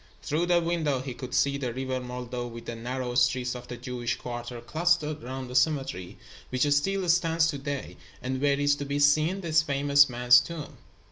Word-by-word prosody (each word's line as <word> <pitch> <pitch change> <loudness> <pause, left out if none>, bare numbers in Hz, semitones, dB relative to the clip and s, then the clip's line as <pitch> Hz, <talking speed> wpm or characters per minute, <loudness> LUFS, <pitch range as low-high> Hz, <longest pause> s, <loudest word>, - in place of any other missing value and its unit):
Through 165 +4 0
the 175 -1 +4
window 165 -5 0
he 130 0 -5
could 125 +1 -6
see 140 +2 +2
the 125 -4 -3
River 130 0 -2
Moldau 125 -1 -5
with 115 0 -9
the 115 - -5
narrow 125 +2 -4
streets 125 0 +2
of 125 -1 -9
the 120 - -7
Jewish 120 0 -3
quarter 120 0 -6
clustered 155 +3 0
around 130 +1 -5
the 125 - -8
cemetery, 130 - 0 0.3
which 130 +3 +1
still 190 +6 +1
stands 165 -1 +3
to 145 -3 -3
day, 140 -1 -5 0.2
and 130 +1 -3
where 140 -1 +2
is 145 0 +3
to 145 - -4
be 140 +1 -2
seen 155 +6 +3
this 165 -2 +3
famous 140 -1 +4
man's 125 0 +6
tomb. 160 +2 -7
135 Hz, 195 wpm, -27 LUFS, 125-155 Hz, 0.3 s, man's